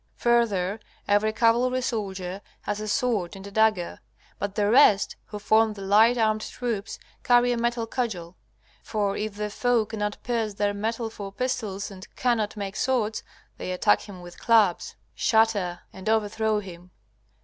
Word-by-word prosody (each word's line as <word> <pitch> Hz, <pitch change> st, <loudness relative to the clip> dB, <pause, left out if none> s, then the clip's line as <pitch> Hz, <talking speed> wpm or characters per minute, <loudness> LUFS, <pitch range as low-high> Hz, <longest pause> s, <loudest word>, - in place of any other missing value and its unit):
Further, 220 Hz, -5 st, +1 dB, 0.3 s
every 205 Hz, +1 st, +3 dB
cavalry 240 Hz, +3 st, +2 dB
soldier 195 Hz, -5 st, -3 dB, 0.2 s
has 205 Hz, 0 st, -3 dB
a 215 Hz, -, -5 dB
sword 210 Hz, -6 st, 0 dB
and 195 Hz, 0 st, -10 dB
a 200 Hz, -, -9 dB
dagger. 215 Hz, -4 st, +1 dB, 0.4 s
But 200 Hz, 0 st, -3 dB
the 205 Hz, -1 st, +1 dB
rest, 215 Hz, -4 st, +5 dB
who 210 Hz, -, -7 dB
form 220 Hz, +1 st, +3 dB
the 200 Hz, -2 st, -9 dB
light 220 Hz, +5 st, +5 dB
armed 215 Hz, -1 st, +2 dB
troops, 225 Hz, -3 st, -4 dB, 0.3 s
carry 245 Hz, 0 st, +4 dB
a -, -, +1 dB
metal 235 Hz, 0 st, 0 dB
cudgel. 205 Hz, -8 st, -4 dB, 0.5 s
For 205 Hz, -3 st, -1 dB
if 210 Hz, -1 st, -4 dB
the 210 Hz, 0 st, -3 dB
foe 240 Hz, 0 st, +1 dB
cannot 210 Hz, -1 st, -3 dB
pierce 225 Hz, -4 st, -1 dB
their 205 Hz, 0 st, 0 dB
metal 225 Hz, +2 st, -3 dB
for 200 Hz, -3 st, -7 dB
pistols 210 Hz, -4 st, -3 dB
and 190 Hz, 0 st, -11 dB
cannot 225 Hz, -4 st, 0 dB
make 200 Hz, -1 st, -5 dB
swords, 235 Hz, -5 st, 0 dB, 0.4 s
they -, -, -5 dB
attack 185 Hz, +3 st, +2 dB
him 185 Hz, -3 st, -10 dB
with 175 Hz, 0 st, -12 dB
clubs, 220 Hz, -6 st, +3 dB, 0.2 s
shatter 215 Hz, -6 st, +1 dB
and 190 Hz, +3 st, -5 dB
overthrow 220 Hz, 0 st, +1 dB
him. 180 Hz, -2 st, -11 dB
215 Hz, 160 wpm, -26 LUFS, 200-230 Hz, 0.5 s, rest